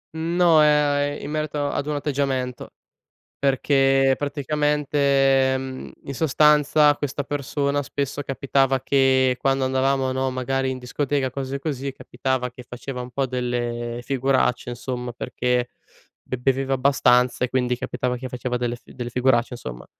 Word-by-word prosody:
Mhmm, 165 Hz, +2 st, -2 dB
no, 170 Hz, -3 st, +5 dB
ehm, 145 Hz, -1 st, +2 dB
in 150 Hz, -, -5 dB
merito 155 Hz, -1 st, -2 dB
ad 140 Hz, -, -3 dB
un 150 Hz, -, -1 dB
atteggiamento. 135 Hz, -3 st, -2 dB, 0.7 s
Perché 135 Hz, 0 st, +3 dB
praticamente, 140 Hz, -2 st, +1 dB
mhmm, 130 Hz, 0 st, -7 dB
in 140 Hz, -, -5 dB
sostanza 150 Hz, 0 st, +4 dB
questa 145 Hz, 0 st, -3 dB
persona 145 Hz, 0 st, -1 dB
spesso 140 Hz, +1 st, -3 dB
capitava 135 Hz, -1 st, +1 dB
che 130 Hz, -2 st, +3 dB
quando 135 Hz, -1 st, +1 dB
andavamo, 130 Hz, 0 st, +1 dB
no, 130 Hz, 0 st, 0 dB
magari 130 Hz, +1 st, -1 dB
in 130 Hz, -, -4 dB
discoteca, 135 Hz, +2 st, -1 dB
cose 135 Hz, 0 st, -4 dB
così, 140 Hz, -2 st, -3 dB
capitava 130 Hz, 0 st, -3 dB
che 125 Hz, +1 st, -12 dB
faceva 125 Hz, +1 st, -6 dB
un 125 Hz, -, -7 dB
po' 135 Hz, +1 st, 0 dB
delle 120 Hz, -1 st, -3 dB
figuracce 130 Hz, -2 st, 0 dB
insomma, 125 Hz, 0 st, -5 dB
perché 125 Hz, 0 st, -1 dB, 0.5 s
be 130 Hz, -, -4 dB
beveva 135 Hz, +1 st, 0 dB
abbastanza 125 Hz, -2 st, +3 dB
e -, -, -8 dB
quindi 125 Hz, -1 st, 0 dB
capitava 125 Hz, 0 st, -2 dB
che 130 Hz, +1 st, -6 dB
faceva 125 Hz, 0 st, -3 dB
delle 120 Hz, 0 st, -2 dB
fi 120 Hz, -, -17 dB
delle 120 Hz, -1 st, -5 dB
figuracce, 125 Hz, -1 st, +2 dB
insomma. 60 Hz, -, -8 dB
135 Hz, 145 wpm, -23 LUFS, 125-140 Hz, 0.7 s, no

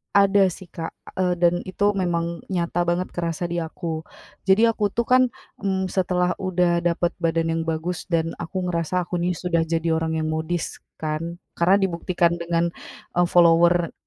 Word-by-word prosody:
Ada 200 Hz, -1 st, +5 dB
sih 180 Hz, 0 st, -10 dB
Kak, 165 Hz, -1 st, -6 dB, 0.2 s
eee, 180 Hz, -1 st, +2 dB
dan 175 Hz, 0 st, +4 dB
itu 205 Hz, +2 st, +1 dB
memang 170 Hz, -3 st, -1 dB
nyata 175 Hz, -1 st, 0 dB
banget 175 Hz, +1 st, 0 dB
kerasa 170 Hz, -1 st, -2 dB
di 170 Hz, 0 st, -2 dB
aku, 160 Hz, 0 st, -4 dB, 0.5 s
jadi 220 Hz, +4 st, +5 dB
aku 215 Hz, -2 st, 0 dB
tuh 235 Hz, -, -1 dB
kan, 255 Hz, +2 st, +5 dB, 0.4 s
mmm, 190 Hz, -1 st, 0 dB
setelah 180 Hz, -1 st, +1 dB
udah 180 Hz, -2 st, +2 dB
dapet 175 Hz, 0 st, +1 dB
badan 165 Hz, -1 st, +1 dB
yang 165 Hz, -, -1 dB
bagus 165 Hz, +2 st, -3 dB
dan 165 Hz, -1 st, +1 dB
aku 175 Hz, +2 st, -3 dB
ngerasa 180 Hz, +1 st, 0 dB
aku 175 Hz, 0 st, -3 dB
nih 180 Hz, +1 st, 0 dB
sudah 170 Hz, -2 st, 0 dB
jadi 165 Hz, 0 st, 0 dB
orang 160 Hz, 0 st, 0 dB
yang -, -, -1 dB
modis 160 Hz, +2 st, -3 dB, 0.2 s
kan, 160 Hz, +2 st, -3 dB, 0.2 s
karena 175 Hz, +3 st, +5 dB
dibuktikan 170 Hz, -1 st, +1 dB
dengan, 170 Hz, 0 st, 0 dB, 0.4 s
eee, 175 Hz, 0 st, +3 dB
follower 170 Hz, 0 st, +5 dB
175 Hz, 165 wpm, -23 LUFS, 165-180 Hz, 0.5 s, Ada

